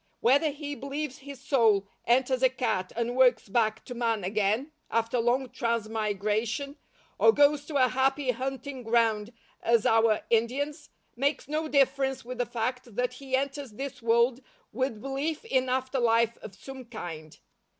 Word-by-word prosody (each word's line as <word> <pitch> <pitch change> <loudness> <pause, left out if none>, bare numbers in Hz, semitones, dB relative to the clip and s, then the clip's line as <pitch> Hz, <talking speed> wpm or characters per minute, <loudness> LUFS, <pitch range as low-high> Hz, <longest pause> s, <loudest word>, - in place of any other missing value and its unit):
Whether 280 +6 +4
he 290 0 -6
believes 280 0 -5
his 280 -1 -10
soul 225 -8 +3 0.2
enters 255 +1 +2
a 260 - +5
cat 220 -8 -2
and 235 +1 -1
works 250 -4 +4
back 220 +1 0
to 245 - -6
man 230 -4 -1
again 210 - 0 0.2
after 230 +1 0
long 245 +2 +1
transmigration, 220 +3 -1 0.4
or - - +7
goes 290 -3 +3
to 305 - -7
a 255 -2 +4
Happy 265 +1 +1
Hunting 265 +1 -5
Ground 225 -2 +1 0.3
as 230 -1 +2
our 225 -1 +4
Indians, 280 +7 0 0.3
makes 280 +5 -1
no 310 +2 -2
difference 270 -2 +1
with 250 0 -7
the 245 - 0
fact 245 0 -3
that 250 +1 0
he 265 0 -3
enters 275 -2 -3
this 270 +4 -6
world 235 +2 +3 0.3
with 255 -2 -2
belief 290 +7 -3
in 260 - +1
after 260 +1 -1
life 230 -1 +3
of 195 - -10
some 265 +2 -10
kind. 165 -9 -8
250 Hz, 155 wpm, -28 LUFS, 230-275 Hz, 0.4 s, or